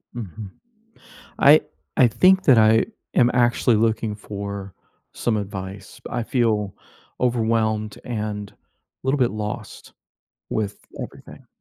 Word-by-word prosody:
Mhm. 105 -2 -7 0.9
I 150 +3 +7 0.4
I 125 - +7
think 190 +9 +4
that 130 -6 +6
I 110 +1 +5 0.3
am 120 -1 +5
actually 120 -1 +3
looking 110 -1 +1
for 100 -2 -6 0.4
some 115 -2 0
advice, 95 -1 -7
I 120 -1 -2
feel 110 -5 0 0.5
overwhelmed 110 -3 0
and 105 -3 -4 0.5
little 135 +2 +1
bit 125 -3 +3
lost 105 0 -6 0.6
with 105 -2 -2 0.2
everything. - - -11
110 Hz, 110 wpm, -23 LUFS, 105-120 Hz, 0.9 s, I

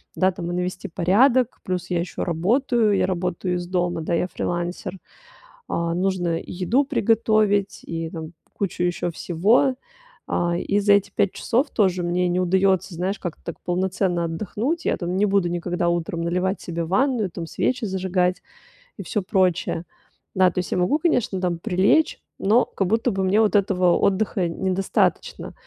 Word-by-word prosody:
Да, 190 0 +3
там 175 -2 -6
и - - -3
навести 180 +2 -3
порядок, 230 +9 +3
плюс 180 -1 -3
я 175 -1 0
ещё 175 +1 -3
работаю, 215 - +2
я - - +2
работаю 180 0 -2
из 175 0 -4
дома, 175 -2 -1
да, 165 - -2
я 175 +2 +1
фрилансер. 175 +2 -3 0.7
Э, 170 0 -1
нужно 180 -3 0
и - - -10
еду 195 +10 +1
приготовить, 215 -5 +1
и 165 -1 -4
там 160 0 -7 0.2
кучу 185 -3 -2
ещё 175 0 -1
всего. 215 - +2 0.6
Э, 175 0 +1
и 205 +1 0
за 205 0 +4
эти 200 0 +2
5 200 - +2
часов 255 +5 0
тоже 185 -4 +2
мне 180 +1 +1
не 180 +1 0
удаётся, 190 0 +2
знаешь, 185 +4 -2
как-то 175 -4 -6
так 170 - -7
полноценно 180 -1 0
отдохнуть. 215 - -3
Я - - +1
там 180 +1 -3
не 210 - +3
буду 195 -3 +2
никогда 175 0 -2
утром 170 -1 -2
наливать 180 +3 -1
себе 170 -1 -4
ванную, 225 - +1
там 165 -1 -6
свечи 245 +4 -1
зажигать 185 -1 0 0.6
и - - -6
всё 210 - -2
прочее. 185 -3 0 0.5
Да, 185 -1 +4
то - - -2
есть 180 - -4
я - - 0
могу, 275 - +2
конечно, 245 - 0
там 175 -2 -1
прилечь, 195 - +2 0.2
но 220 +6 +3
как 195 - -2
будто 225 +3 +1
бы 190 -1 -1
мне 195 +3 +3
вот 215 -1 +2
этого 185 -3 +3
отдыха 195 -2 +1
недостаточно. 190 +2 -1
185 Hz, 170 wpm, -23 LUFS, 175-205 Hz, 0.7 s, за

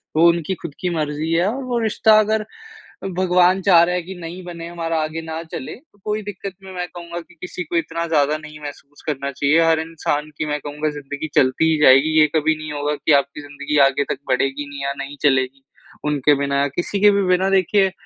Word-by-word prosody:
वो 165 +2 +6
उनकी 170 +2 0
ख़ुद 165 -4 -6
की 180 - -1
मर्जी 155 +1 -2
है 170 +2 +3
और 260 +6 -2
वो 245 -2 -1
रिश्ता 220 -1 +4
अगर 215 0 +1 0.7
भगवान 185 0 +3
चाह 180 -3 +6
रहा 180 +1 +1
है 180 - 0
कि 185 +3 -8
नहीं 175 +2 -7
बने 170 -1 -7
हमारा 165 -1 -3
आगे 155 +1 -4
ना 160 0 -5
चले 130 - -6
तो 250 -6 -23
कोई 215 0 -1
दिक़्क़त 200 -1 -7
मैं 185 -2 -5
कहूँगा 170 0 -8
कि 175 - -20
किसी 180 0 -5
को 170 - -6
इतना 165 0 -2
ज़्यादा 150 -2 +2
नहीं 155 0 -11
महसूस 145 0 -10
करना 140 -2 -2
चाहिए। 140 +4 +2
हर 165 -1 +3
इंसान 155 -2 -2
की 155 - -2
मैं 150 0 -2
कहूँगा 150 +1 -3
ज़िंदगी 145 +2 -5
चलती 140 +5 +3
ही 160 - +2
जाएगी 135 +1 +6
ये 155 - +6
कभी 160 0 +2
नहीं 155 0 -7
होगा 145 0 -1
कि 150 - -1
आपकी 140 +2 -11
ज़िंदगी 145 +1 -3
आगे 140 +1 0
तक - - -10
बढ़ेगी 135 +3 0
नहीं 140 -1 -7
या 140 0 -1
नहीं 140 +1 -7
चलेगी। 135 -1 +1 0.4
उनके 145 0 +3
बिना 140 0 0
या 140 - +2
किसी 185 +3 -2
के 205 +1 +6
भी 200 0 +2
बिना 185 +1 +3
देखिए 195 0 +3
160 Hz, 220 wpm, -20 LUFS, 145-180 Hz, 0.7 s, वो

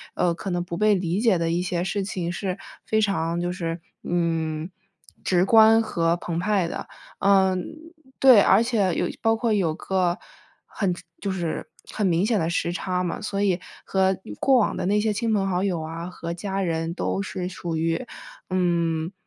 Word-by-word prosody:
呃， 175 - +2
可 190 +3 -6
能 175 -1 -1
不 175 -1 -6
被 210 0 +4
理 180 0 -1
解 225 -6 +4
的 165 -1 0
一 170 +1 +1
些 180 -1 -1
事 195 +2 -1
情 180 -3 -3
是 185 +1 -3 0.3
非 220 - +1
常 170 -5 0
就 175 0 -1
是， 170 -2 -3 0.2
嗯， 165 -2 -1 0.5
直 180 0 +3
观 225 +1 +7
和 170 -5 0
澎 170 -1 -3
湃 190 -1 +1
的。 - - -5 0.3
呃， 190 -1 +4 0.6
对， 255 -6 +8
而 225 - +5
且， 220 -6 +1
有 - - 0
包 225 0 +3
括 225 -1 0
有 170 -6 +1
个， 180 -1 0 0.5
很 185 -4 -2 0.3
就 200 - -2
是 175 -4 -3 0.2
很 210 - +1
明 175 +2 +2
显 220 -1 +2
的 165 - 0
时 170 0 0
差 180 0 -1
嘛， 175 - -3
所 200 -1 -3
以 190 -3 +2 0.3
和 190 -1 +2 0.2
过 270 -1 +4
往 225 - +2
的 - - -2
那 205 +2 +3
些 215 0 +1
亲 230 +2 -1
朋 200 -2 +1
好 185 -1 0
友 185 -4 0
啊、 165 +2 -5
和 170 -2 -5
家 195 +2 -3
人 165 -1 -2
都 195 - -1
是 185 -2 -4
属 175 -3 -4
于， 165 +7 0 0.5
嗯， 170 -2 0
185 Hz, 200 characters per minute, -24 LUFS, 170-200 Hz, 0.6 s, 对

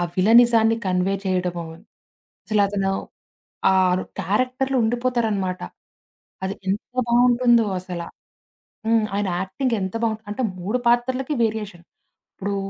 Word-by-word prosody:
విలనిజాన్ని 225 +2 +5
convey 185 +1 +1
చేయడము. 180 -2 -1 0.8
అసలతను 200 -2 +1 0.8
ఆరు 185 -1 +3 0.2
క్యారెక్టర్‌లో 255 +7 0
ఉండిపోతారనమాట. 220 -6 0 0.8
అది 190 +1 -2
ఎంత 200 +2 0 0.3
బావుంటుందో 240 -1 +4
అసలా. 180 -2 -6 0.8
హ్మ్. 225 -1 +3
ఆయన 205 0 0
యాక్టింగ్ 230 +6 -1
ఎంత 190 -1 -3
బావుంటు 220 -1 -1
అంటే 210 - -3 0.2
3 200 +7 -1
పాత్రలకి 255 +4 +1
వేరియేషన్. 210 -6 -3 0.5
ఇప్పుడు 200 +1 -3
215 Hz, 100 wpm, -22 LUFS, 190-240 Hz, 0.8 s, విలనిజాన్ని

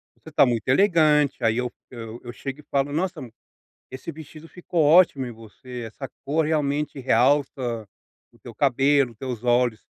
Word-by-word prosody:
Você - - -14
tá - - +5
muito 120 -3 -1
elegante, 150 -4 +3
aí 115 0 +2
eu 125 0 -2 0.2
eu 115 -1 -8
eu 120 - -7
chego 135 +4 -7
e - - -13
falo: 140 +1 0
"Nossa! 180 +2 -2 0.7
Esse 130 +5 -7
vestido 155 +1 -12
ficou 175 -2 -2
ótimo 150 -3 +5
em - - -7
você! 115 +2 -10
Essa 130 +4 -8 0.2
cor 155 +3 +1
realmente 150 -2 -1
realça 125 -3 +1 0.5
o - - -24
teu - - -12
cabelo, 135 -1 +2
teus 125 0 -6
olhos!" 120 -2 +1
135 Hz, 160 wpm, -24 LUFS, 120-150 Hz, 0.7 s, tá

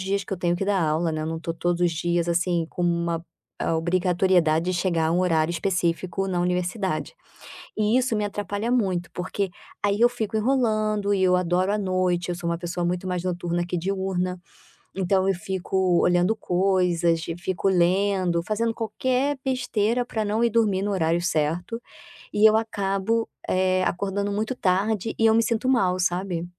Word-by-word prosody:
dias 195 +1 -1
que - - -7
eu - - -1
tenho 175 -1 0
que 195 - -2
dar 200 -1 +1
aula, 160 +1 0
né, 155 - -2
eu - - -3
não 160 0 -3
tô 165 0 -4
todos 175 +1 -1
os 175 -1 +3
dias, 170 +1 -1
assim, 170 -1 +1
com 175 - -5
uma, 170 -1 0 0.4
ah, 165 - 0
obrigatoriedade 175 -1 +2
de - - -1
chegar 165 -3 +1
um 175 - +2
horário 165 -2 +2
específico 180 +1 -1
na 180 -2 -1
universidade. 180 - -1 0.6
E 215 +3 +2
isso 255 -3 +1
me 210 - 0
atrapalha 205 +2 -3
muito, 190 -8 0
porque 185 +2 -3 0.3
aí 205 0 +1
eu 240 - +7
fico 220 -3 -3
enrolando 215 -4 +1
e 190 - +1
eu 180 -1 +4
adoro 180 +2 +1
a 210 - +1
noite, 185 -2 0
eu 175 - -1
sou 175 0 -5
uma 170 0 -2
pessoa 175 0 -3
muito 180 +2 -2
mais 180 -1 -2
noturna 175 -1 -2
que 175 - -3
diurna, 185 0 -2 0.6
então 190 0 +2
eu 195 - +3
fico 185 0 0
olhando 180 +4 +3
coisas, 180 -4 +1 0.2
fico 185 +1 -1
lendo, 185 -1 +2
fazendo 220 +5 -1
qualquer 260 +5 -1
besteira 245 -2 0
pra 220 -3 -2
não 210 +2 0
ir 235 - +4
dormir 210 -4 +2
no 205 - -1
horário 170 -2 +1
certo, 175 +6 -1 0.5
e 210 +1 +6
eu 215 - +3
acabo, 220 0 -1 0.2
eh, 185 0 +2
acordando 200 +2 -1
muito 215 +4 -1
tarde 200 +1 0
e 225 - +2
eu 220 - +5
me 225 - +4
sinto 230 +3 0
mal, 190 -8 +2
sabe. 180 -1 -1
185 Hz, 180 wpm, -24 LUFS, 175-205 Hz, 0.6 s, eu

